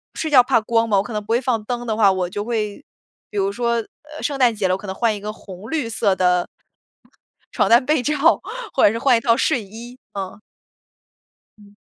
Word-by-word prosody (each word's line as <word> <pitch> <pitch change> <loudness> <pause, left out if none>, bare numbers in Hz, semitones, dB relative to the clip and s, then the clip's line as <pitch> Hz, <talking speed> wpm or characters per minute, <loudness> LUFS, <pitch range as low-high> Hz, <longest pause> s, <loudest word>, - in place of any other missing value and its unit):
睡 315 - -3
觉 265 -4 +8
怕 250 0 +2
光 230 +1 0
嘛， 205 - +3
我 195 - +2
可 230 - -8
能 210 -1 -3
不 - - -25
会 235 - +3
放 240 -4 -1
灯 240 +1 -4
的 220 - -1
话， 205 -3 +5
我 185 -1 -1
就 205 +3 -4
会， 220 +1 -3 0.5
比 210 - -7
如 195 0 +1
说， 235 +2 -1
呃， 300 +7 -8
圣 280 -2 -2
诞 245 -3 +4
节 205 -3 0
了， 185 - +1
我 - - 0
可 200 +1 -10
能 190 - -5
换 230 -1 +1
一 - - -7
个 210 +1 -4
红 195 -1 -11
绿 300 -7 -1
色 215 -3 +1
的 180 -1 +2 1.1
床 - - +1
单 240 +3 +5
被 305 -2 +2
罩， 300 - 0 0.6
或 - - +2
者 - - +5
是 230 - -3
换 255 -2 +4
一 - - 0
套 230 0 +2
睡 260 -2 +1
衣， 235 +5 -11
嗯。 195 0 -6 1.2
嗯。 205 -1 -18
225 Hz, 250 characters per minute, -21 LUFS, 205-245 Hz, 1.2 s, 觉